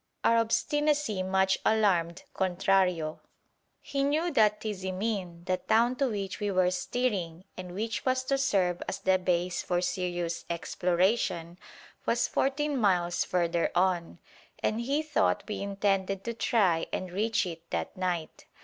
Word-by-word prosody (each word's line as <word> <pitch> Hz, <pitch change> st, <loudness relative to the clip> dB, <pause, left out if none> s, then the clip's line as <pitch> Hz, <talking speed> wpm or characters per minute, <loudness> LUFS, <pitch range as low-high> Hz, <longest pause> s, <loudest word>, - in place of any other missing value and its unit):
Our 230 Hz, -, +4 dB
obstinacy 295 Hz, -1 st, +1 dB
much 190 Hz, 0 st, +2 dB
alarmed 185 Hz, -6 st, +2 dB
Contrario. 185 Hz, -3 st, +1 dB, 0.6 s
He 275 Hz, -1 st, -1 dB
knew 310 Hz, +5 st, +1 dB
that 210 Hz, -6 st, +3 dB
Tizimin, 190 Hz, -3 st, -3 dB
the 185 Hz, 0 st, +1 dB
town 230 Hz, +6 st, +2 dB
to 275 Hz, -2 st, +2 dB
which 200 Hz, -3 st, -4 dB
we 205 Hz, -1 st, -1 dB
were 185 Hz, -2 st, +2 dB
steering 185 Hz, -4 st, -2 dB
and 180 Hz, -1 st, -8 dB
which 220 Hz, +2 st, -3 dB
was 255 Hz, 0 st, +1 dB
to 275 Hz, +1 st, 0 dB
serve 185 Hz, -9 st, +1 dB
as -, -, -3 dB
the 190 Hz, 0 st, +2 dB
base 180 Hz, -1 st, 0 dB
for 175 Hz, -1 st, 0 dB
serious 175 Hz, -2 st, -2 dB
exploration, 175 Hz, 0 st, 0 dB, 0.5 s
was -, -, +2 dB
fourteen 290 Hz, +1 st, 0 dB
miles 175 Hz, -5 st, +2 dB
further 170 Hz, -1 st, 0 dB
on, 175 Hz, -2 st, +1 dB, 0.5 s
and 220 Hz, +2 st, +1 dB
he 280 Hz, +6 st, 0 dB
thought 305 Hz, -1 st, +1 dB
we 210 Hz, -, -4 dB
intended 195 Hz, -1 st, 0 dB
to 235 Hz, -, -3 dB
try 195 Hz, -8 st, +2 dB
and 185 Hz, -1 st, -3 dB
reach 215 Hz, +3 st, +1 dB
it 170 Hz, -1 st, -8 dB
that -, -, -3 dB
night. 180 Hz, -4 st, -3 dB
190 Hz, 140 wpm, -29 LUFS, 180-225 Hz, 0.6 s, Our